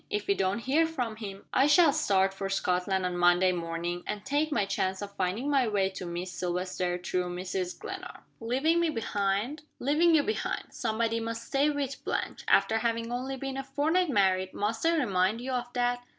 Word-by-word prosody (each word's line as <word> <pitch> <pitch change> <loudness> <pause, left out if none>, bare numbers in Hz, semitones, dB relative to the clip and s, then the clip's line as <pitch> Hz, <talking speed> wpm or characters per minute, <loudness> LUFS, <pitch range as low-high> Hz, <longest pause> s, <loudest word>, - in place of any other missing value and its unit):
If 210 0 -2
we 200 - +3
don't 190 0 0
hear 280 +8 +2
from 245 -9 -3
him, 200 -3 -8
I 270 +2 +4
shall 305 -1 +6
start 195 -10 +2
for 195 0 -4
Scotland 185 0 0
on 180 -1 -1
Monday 175 +1 +4
morning, 170 0 -3
and 210 -1 -4
take 290 +3 0
my 210 -8 +1
chance 190 -1 -1
of 200 0 -8
finding 190 +9 -1
my 275 -4 +3
way 200 -3 +1
to 185 -1 -6
Miss 175 +1 -4
Silvester, 180 0 -2
through 180 0 -2
Mrs. 185 0 -3
Glenarm." - - -8 0.2
"Leaving 270 +9 +1
me 340 -1 +2
behind?" 220 +2 -1 0.2
"Leaving 320 +5 +3
you 295 - +4
behind. 435 - -2
Somebody 230 0 0
must 230 0 -4
stay 280 +2 +2
with 280 -2 -3
Blanche. - - -3
After 225 0 +4
having 230 0 -1
only 260 +2 -3
been 270 0 -4
a 270 - -3
fortnight 310 +6 +1
married, 190 -5 +2
must 220 +2 -2
I 335 0 +3
remind 200 - +1
you 255 +2 -4
of 245 -1 -2
that?" 245 0 0
225 Hz, 195 wpm, -29 LUFS, 185-270 Hz, 0.2 s, shall